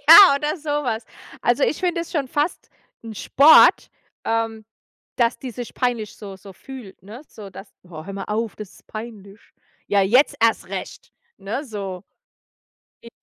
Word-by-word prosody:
Ja 335 Hz, -1 st, +10 dB
oder 300 Hz, +4 st, -2 dB
so 310 Hz, -1 st, -11 dB
was. 245 Hz, -7 st, -1 dB, 0.4 s
Also 245 Hz, +3 st, +1 dB
ich 305 Hz, -, +1 dB
finde 350 Hz, -2 st, 0 dB
es 335 Hz, -, -7 dB
schon 285 Hz, -6 st, -1 dB
fast 295 Hz, +6 st, -2 dB, 0.4 s
'n 225 Hz, -1 st, -8 dB
Sport, 290 Hz, +9 st, +6 dB, 0.4 s
ähm, 225 Hz, -1 st, -2 dB, 0.5 s
dass 235 Hz, -1 st, +1 dB
die 260 Hz, -, -7 dB
sich 240 Hz, +1 st, -8 dB
peinlich 240 Hz, -4 st, -2 dB
so 200 Hz, -2 st, -9 dB
so 195 Hz, 0 st, -13 dB
fühlt, 235 Hz, -3 st, -12 dB
ne, 220 Hz, +7 st, -11 dB
so 205 Hz, -2 st, -11 dB
dass: 195 Hz, +2 st, -11 dB, 0.2 s
„Oh, 155 Hz, -3 st, -10 dB
hör 195 Hz, -, -8 dB
mal 195 Hz, 0 st, -5 dB
auf, 220 Hz, +1 st, -3 dB
das 210 Hz, -3 st, -9 dB
ist -, -, -21 dB
peinlich.“ 215 Hz, -2 st, -9 dB, 0.5 s
Ja, 200 Hz, -, +2 dB
jetzt 250 Hz, +9 st, +3 dB
erst 230 Hz, 0 st, +2 dB
recht, -, -, -7 dB, 0.3 s
ne, 230 Hz, +9 st, -4 dB
so. 200 Hz, -7 st, -6 dB, 1.0 s
J 235 Hz, -, -11 dB
225 Hz, 170 wpm, -22 LUFS, 200-275 Hz, 1.0 s, Ja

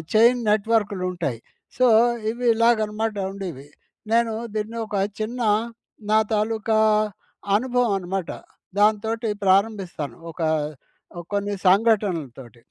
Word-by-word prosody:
Chain 240 Hz, +3 st, +5 dB
నెట్వర్క్‌లు 210 Hz, -3 st, +1 dB
ఉంటాయి. 150 Hz, -, -3 dB, 0.4 s
So, 255 Hz, 0 st, +4 dB, 0.4 s
ఇవి, 245 Hz, +1 st, -5 dB
ఇలాగ 230 Hz, 0 st, +4 dB
అనమాట 215 Hz, +1 st, -3 dB, 0.2 s
ఉండేవి 175 Hz, -9 st, -7 dB, 0.4 s
నేను 230 Hz, -1 st, +2 dB, 0.2 s
దీన్ని 215 Hz, +2 st, -3 dB
ఒక 205 Hz, -, -5 dB, 0.2 s
చిన్న 240 Hz, +3 st, -3 dB, 0.7 s
నా 215 Hz, -, +6 dB
తాలూకా 220 Hz, +1 st, 0 dB, 0.8 s
అనుభవం, 245 Hz, -1 st, +1 dB
అనమాట 185 Hz, -1 st, -4 dB, 0.5 s
దాంతోటి 220 Hz, +2 st, +1 dB
ప్రారంభిస్తాను 190 Hz, -, 0 dB
ఒక 170 Hz, -, -9 dB, 0.9 s
కొన్ని 200 Hz, 0 st, -1 dB
సంఘటనలతోటి. 175 Hz, -, +1 dB
210 Hz, 100 wpm, -23 LUFS, 190-225 Hz, 0.9 s, నా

